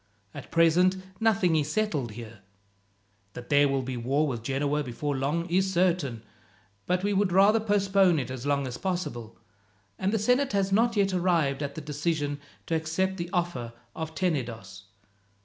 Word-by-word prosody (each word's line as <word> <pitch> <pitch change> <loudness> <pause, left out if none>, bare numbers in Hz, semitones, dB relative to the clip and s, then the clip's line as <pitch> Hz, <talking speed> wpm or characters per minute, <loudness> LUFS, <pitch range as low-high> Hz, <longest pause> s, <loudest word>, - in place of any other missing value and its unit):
At - - -9
present 175 +3 +4 0.2
nothing 200 -7 +2
is 150 -1 0
settled 150 - -1
here. 115 -1 -10 0.9
That 125 0 -9
there 145 -1 +5
will 135 -1 0
be 130 0 -4
war 135 +6 +1
with 120 -5 -3
Genoa 140 +4 -1
before 140 +3 -3
long 145 +6 -1
is 190 +2 +1
certain, 170 -10 0 0.6
but 180 +1 0
we 205 0 +1
would 195 -1 +1
rather 200 +4 +5
postpone 195 -4 +3
it 130 -3 -3
as 130 -2 -6
long 140 -1 0
as 125 -2 -6
possible, 175 - -4 0.6
and 190 +1 0
the 220 - +1
senate 250 +4 +1
has 195 -1 +1
not 230 +3 +3
yet 195 -2 +2
arrived 170 -6 +1
at 140 -1 -4
the 160 - -5
decision 150 -1 -2 0.3
to - - -3
accept 165 +4 -1
the 170 -1 -4
offer 170 -10 -2 0.2
of 160 0 -5
Tenedos. 115 - -3
160 Hz, 165 wpm, -27 LUFS, 135-190 Hz, 0.9 s, there